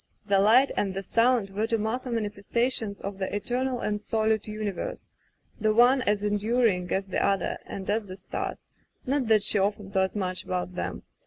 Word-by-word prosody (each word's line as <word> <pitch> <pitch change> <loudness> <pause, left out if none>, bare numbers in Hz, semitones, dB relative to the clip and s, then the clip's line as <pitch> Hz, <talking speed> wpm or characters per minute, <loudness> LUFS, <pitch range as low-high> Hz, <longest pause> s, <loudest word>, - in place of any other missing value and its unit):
The 200 -2 +3
Light 235 +7 +5
and 195 -2 -1
the 195 - -3
Sound 230 -1 +2
were 210 +3 -1
to 230 -1 +1
Martha 225 +4 -2
mani 225 -3 -1
festations 220 0 -1
of 200 0 -5
the 190 +1 -2
eternal 250 +4 -1
and 210 0 -1
solid 220 0 0
universe, 210 -3 -4 0.5
the 215 -1 +2
one 250 +3 +6
as 210 -3 +1
enduring 210 -2 +1
as 195 0 0
the 190 - -1
other 195 -1 0
and 190 -1 -6
as 210 0 0
the 185 0 -8
stars 190 - -5 0.2
— - - -34
^not 270 -2 +1
that 215 -2 +4
she 210 0 +2
often 200 0 -1
thought 190 0 +1
much 185 -3 -2
about 180 0 -3
them. 180 - -4
210 Hz, 190 wpm, -27 LUFS, 195-230 Hz, 0.5 s, one